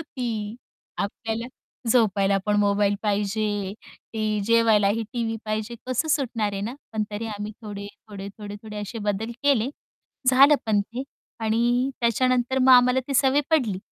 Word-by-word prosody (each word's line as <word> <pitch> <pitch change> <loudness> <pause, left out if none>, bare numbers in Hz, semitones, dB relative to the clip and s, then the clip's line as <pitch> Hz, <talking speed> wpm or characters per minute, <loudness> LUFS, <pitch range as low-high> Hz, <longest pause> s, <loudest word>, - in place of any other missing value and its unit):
ती. 235 -8 -4 0.4
आपल्याला 225 +3 -3 0.4
झोपायला 200 -4 +3
पण 210 0 +2
मोबाईल 205 0 +2
पाहिजे, 205 -1 -1 0.4
ते 215 -1 0
जेवायलाही 225 -2 +4
टीव्ही 230 -2 -2
पाहिजे, 215 +2 -3
कसं 255 +5 -1
सुटणार 240 -8 0
आहे 195 - -3
ना, 230 +5 -4 0.2
पण 220 - 0
तरी 210 +2 -4
आम्ही 210 -1 -5
थोडे, 205 -2 -6 0.2
थोडे, 200 -1 -7
थोडे, 205 -1 -7
थोडे 215 -1 -8
असे 205 +3 -6
बदल 210 +2 -2
केले, 265 -5 +3 0.6
झालं 275 +3 +7
पण 210 -2 +3
ते 235 +5 -5 0.4
आणि 240 +4 +1
त्याच्यानंतर 250 +2 +2
मग 260 0 +6
आम्हाला 250 +1 +6
ती 275 - -2
सवय 270 +2 +4
पडली. 245 -12 +2
220 Hz, 145 wpm, -24 LUFS, 205-245 Hz, 0.6 s, झालं